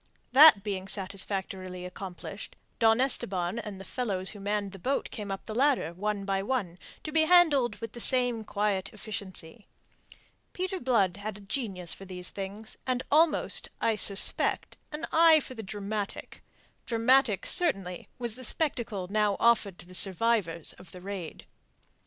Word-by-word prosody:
That 270 -6 +8
being 195 -2 -4
satisfactorily 190 -2 -2
accomplished, 185 +2 -9 0.2
Don 225 0 +4
Esteban 190 -7 +1
and 210 -4 -8
the 195 - -10
fellows 195 -7 -2
who 205 - -11
had - - -11
manned 205 -1 -2
the 195 - -11
boat 270 +9 -2
came 205 -2 -6
up 195 - -6
the 215 - -6
ladder, 250 - +1
one 205 +2 -3
by 195 -1 -1
one, 195 -6 -3 0.2
to 305 - -6
be 315 0 +2
handled 315 -8 +4
with 230 -2 -8
the 240 - -10
same 245 -3 +3
quiet 205 -2 -2
efficiency. 205 -2 -7 0.9
Peter 370 +1 -3
Blood 205 - +1
had 205 0 -6
a - - -14
genius 195 -5 -4
for 195 - -11
these 180 -1 -7
things, 200 +3 -6
and 255 0 -1
almost, 310 +1 +4
I 225 - +1
suspect, 200 -2 +3 0.2
an 305 +2 -5
eye 325 -1 +6
for 260 - -8
the 225 - -7
dramatic. 205 0 -6 0.5
Dramatic, 230 -3 +2
certainly, 195 - +2
was 240 -3 -3
the 255 - -10
spectacle 235 - -2
now 210 0 0
offered 220 -5 +2
to - - -11
the 180 - -15
survivors 190 -3 +2
of 180 - -16
the 180 - -11
raid. 190 -4 -8
210 Hz, 160 wpm, -28 LUFS, 190-245 Hz, 0.9 s, That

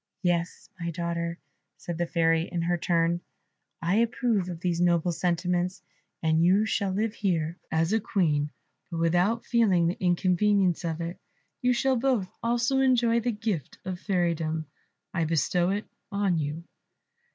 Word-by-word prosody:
"Yes, 175 -1 -1
my 170 0 -3
daughter," 170 0 -3 0.4
said 170 -1 -6
the 175 - 0
Fairy 165 0 +2
in 170 -2 -1
her 175 +1 +1
turn, 170 0 +1 0.6
"I 180 +5 +2
approve 230 -4 +1
of 170 -2 -5
these 175 -1 -1
noble 175 0 +3
sentiments, 180 +1 -1 0.4
and 160 0 +3
you 190 +5 +4
shall 200 -2 0
live 210 +3 -1
here 170 -6 -1
as 165 +4 +1
a 225 - +3
Queen, 155 -9 +1 0.4
but 170 - -5
without 175 +7 +2
feeling 205 -8 +3
the 175 +3 -2
inconvenience 185 +1 +2
of 165 -1 -2
it. 170 +2 -5 0.4
You 250 -1 +3
shall 260 +1 +2
both 240 -6 +1
also 240 +3 +1
enjoy 240 -3 +3
the 240 +1 0
gift 210 - -3
of 185 -1 -4
fairydom. 165 -5 0 0.5
I 170 -2 +1
bestow 165 +3 +1
it 205 +2 -1 0.3
on 200 -4 +1
you." 150 +2 -3
175 Hz, 150 wpm, -27 LUFS, 170-205 Hz, 0.6 s, you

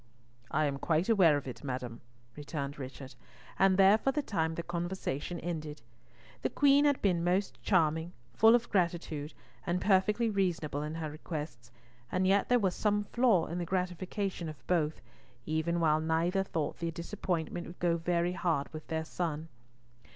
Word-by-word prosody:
"I 155 +1 +1
am 140 -1 -2
quite 165 +7 +1
aware 180 -9 +5
of 140 - -6
it, 125 - -7
madam," 125 -4 -5 0.3
returned 145 -1 -5
Richard, 135 0 -8 0.5
and 195 -1 +5
there 195 +2 +6
for 270 - +1
the 295 +2 -1
time 160 -9 -1
the 170 - -4
conversation 175 -2 -3
ended. 155 -4 -5 0.6
The - - 0
Queen 285 0 +4
had 285 -2 +3
been 175 -4 +2
most 185 +3 0
charming, 160 -2 +2 0.2
full 225 - +6
of 240 0 0
gratitude, 170 -5 -1 0.3
and 175 +1 +1
perfectly 210 +4 +3
reasonable 175 -8 -1
in 150 +1 -4
her 160 -2 -4
requests, 150 -6 -6 0.4
and 185 +1 +1
yet 195 +1 +3
there 245 - +5
was 195 -6 +1
some 205 +1 +1
flaw 235 -8 +4
in 170 +2 -4
the - - -1
gratification 185 0 -2
of 155 -3 -11
both, 160 -4 0 0.5
even 160 +2 0
while 155 -2 +3
neither 165 +4 +1
thought 160 -5 -3
the 170 - -1
disappointment 170 0 -3
would 175 - -10
go 170 -1 +2
very 175 +1 0
hard 165 -6 -1
with 155 -1 -8
their 160 -1 -2
son. 160 -1 -3
170 Hz, 165 wpm, -31 LUFS, 155-190 Hz, 0.6 s, there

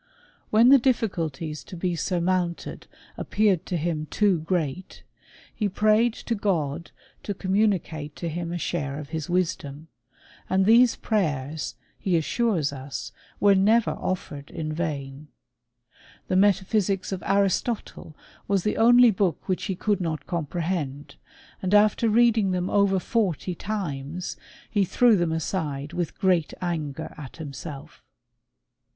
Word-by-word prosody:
When 225 +3 +6
the 275 0 +8
difficulties 165 - -1
to 180 - -9
be 175 0 -1
surmounted 175 0 -1 0.3
appeared 205 -5 +1
to 180 - -1
him 155 -1 -2
too 200 -2 +2
great, 170 +1 -3 0.5
he 210 -3 -1
prayed 215 +4 +3
to 235 - -3
God 170 -7 -1 0.3
to 205 - -4
communicate 185 -7 0
to 170 - -4
him 170 +1 -4
a 175 - -2
share 140 -4 -3
of 150 -2 -7
his 160 -1 -4
wisdom; 165 -4 -2 0.6
and 190 0 +3
these 235 +3 +6
prayers, 150 - -2 0.2
he 180 -3 +1
as 160 - 0
sures 180 - 0
us, 135 0 -6 0.3
were 205 -1 +5
never 215 +4 +3
offered 145 -6 -4
in 155 -1 -4
vain. 150 -3 -4 1.0
The 185 - +1
metaphysics 195 0 +2
of 190 - -3
Aristotle 200 -3 -1 0.3
was 195 -2 +1
the 210 - 0
only 240 +1 +7
book 185 -5 -1
which 185 - -1
he 190 - -2
could 205 +1 0
not 160 -3 -3
comprehend, 155 -4 -3 0.5
and 190 +2 +1
after 215 +2 +4
reading 225 -2 +4
them 180 0 -1
over 200 -1 +3
forty 185 - -1
times^ 175 -4 -4 0.3
he 205 -2 +1
threw 235 +5 +4
them 175 -3 +1
aside 160 -3 -3
with 175 -3 -3
great 180 -5 +1
anger 160 -4 -4
at 135 -4 -9
himself. 150 -1 -8
180 Hz, 135 wpm, -25 LUFS, 155-205 Hz, 1.0 s, the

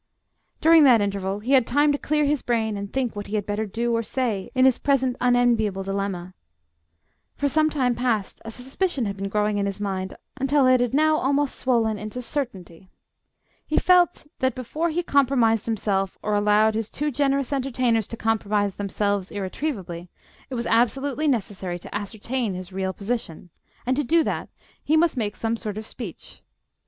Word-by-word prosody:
During 325 0 +7
that 245 -4 +7
interval 200 0 -2
he 245 +5 -3
had 260 -4 +5
time 290 +4 +3
to 285 - 0
clear 300 0 +1
his 290 -1 +1
brain 225 -3 0
and 200 0 -5
think 260 -4 -1
what 205 0 -5
he 215 - -3
had 205 -2 -1
better 210 +1 -2
do 235 +3 -1
or 230 - +1
say 230 -4 -2
in 255 0 +5
his 260 -2 +4
present 265 -3 +1
unenviable 240 -5 +2
dilemma. 195 -2 -3 1.0
For 285 - 0
some 310 +2 +2
time 260 -5 +1
past 230 -5 -1
a 225 - -7
suspicion 265 +4 -2
had 200 -1 -3
been 195 0 -4
growing 210 0 0
in 200 - 0
his 200 0 -4
mind, 190 -2 -3 0.2
until 275 +1 +2
it 255 0 +5
had 245 +1 0
now 310 +1 +4
almost 285 0 +1
swollen 225 -4 +1
into 215 +4 -6
certainty. 195 - -5 0.8
He 310 - 0
felt 355 -2 +4
that, 260 -2 +1
before 305 +7 -2
he 340 +2 -1
compromised 250 -8 +2
himself, 195 -3 -1
or 210 - -1
allowed 210 +1 +3
his 220 -1 -2
too 295 +1 -2
generous 275 0 0
entertainers 255 -5 0
to 230 - -7
compromise 210 -3 0
themselves 200 -1 -1
irretrievably, 190 - -4 0.4
it 260 - -4
was 235 - -3
absolutely 270 +6 +1
necessary 195 -8 -1
to 175 - -12
ascertain 215 +1 -3
his 185 +1 -8
real 190 0 -1
position, 195 -5 -5 0.3
and, 255 +1 +1
to 295 - +1
do 325 +5 +3
that, - - -3 0.3
he 315 - +3
must 330 -1 +3
make 210 -4 -2
some 225 0 -1
sort 215 -2 -5
of 215 - -5
speech. 215 -7 -9
230 Hz, 180 wpm, -24 LUFS, 205-270 Hz, 1.0 s, During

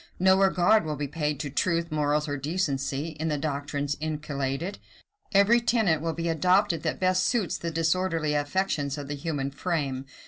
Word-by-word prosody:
No 190 +1 +5
regard 195 +2 +4
will 155 -1 -3
be 145 0 -3
paid 150 -1 -2
to 145 - -5
truth, 170 +2 0
morals, 150 0 +1
or 145 - -2
decency, 145 -1 -2
in 160 - -1
the 150 -2 0
doctrines 145 0 -2
inculcated. 150 +2 -3 0.5
Every 210 +4 +5
tenet 220 -10 +2
will 165 0 -1
be 170 +1 -3
adopted 180 +1 +2
that - - -2
best 185 0 +2
suits 220 -3 0
the 170 - -3
disorderly 165 -1 0
affections 145 -1 -1
of 145 -1 -6
the 145 - -3
human 140 -2 -3
frame. 140 -4 -2
155 Hz, 170 wpm, -27 LUFS, 145-185 Hz, 0.5 s, No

